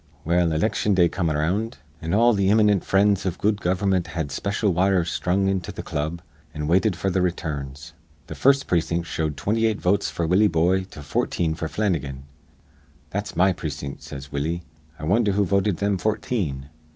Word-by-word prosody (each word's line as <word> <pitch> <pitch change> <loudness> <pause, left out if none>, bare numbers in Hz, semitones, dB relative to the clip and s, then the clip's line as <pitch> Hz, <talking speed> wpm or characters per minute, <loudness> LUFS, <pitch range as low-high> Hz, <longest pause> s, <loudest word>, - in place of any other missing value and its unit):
"Well, 85 0 +2
iliction 100 +5 +1
day 90 -2 +4
come 85 -3 -1
around; 90 +10 -1 0.2
an' 80 +4 -1
all 120 +1 +5
th' - - -2
imminent 105 0 +4
frinds 100 0 +3
iv 90 -3 -2
good 105 0 +1
gover'mint 95 -1 +1
had 80 -4 -4
special 100 +6 0
wires 90 -1 +2
sthrung 95 +2 0
into 95 -2 -1
th' - - -8
club, 80 +4 -3 0.3
an' 75 0 -3
waited 95 +6 +3
f'r 95 +1 -1
th' 95 - +2
returns. 75 -4 -4 0.3
Th' - - -7
first 140 +1 +3
precin't 85 0 0
showed 80 -3 -2
28 110 +6 0
votes 100 +3 +1
f'r 85 - -2
Willie 95 +5 +4
Boye 90 +2 +2
to 75 -6 -11
14 80 +3 -1
f'r 80 0 -4
Flannigan. 75 -11 -2 0.9
'That's - - -4
my 95 +3 +4
precin't,' 75 -4 -6
says 70 +1 -9
Willie. 80 +5 -2 0.3
'I - - -11
wondher 100 +5 +2
who 100 +1 +2
voted 100 -1 +1
thim 100 0 0
fourteen?' 95 - -2
90 Hz, 175 wpm, -24 LUFS, 80-100 Hz, 0.9 s, all